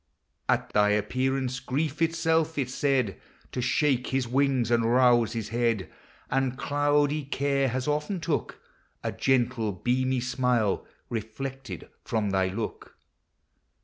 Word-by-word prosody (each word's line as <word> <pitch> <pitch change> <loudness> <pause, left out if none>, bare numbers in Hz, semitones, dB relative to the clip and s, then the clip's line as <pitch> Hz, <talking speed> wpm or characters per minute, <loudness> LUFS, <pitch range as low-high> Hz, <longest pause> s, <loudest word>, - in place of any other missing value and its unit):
• - - +7
••.., - - 0
At - - -18
thy 105 0 +4
appearance, 130 +4 0
Grief 145 +4 -2
itself 165 -1 +1
is 130 -3 -1
said 130 -8 0 0.3
To 125 - -2
shake 130 0 +2
his 130 -2 0
wings, 130 -2 +2
and 115 -1 +3
rouse 120 -2 +4
his 115 -3 -4
head: 115 -4 0 0.4
And 135 -1 +1
cloudy 145 +1 +1
Care 140 0 +1
has 130 +2 -2
often 150 +6 -1
took 160 -3 -2 0.4
A - - -1
gentle 120 -4 +1
beamy 130 +6 0
smile, 125 -4 +1 0.2
reflected 125 +4 -5 0.2
from 110 -3 -1
thy 95 -1 +2
look. 105 +3 -5
130 Hz, 135 wpm, -27 LUFS, 115-140 Hz, 0.4 s, •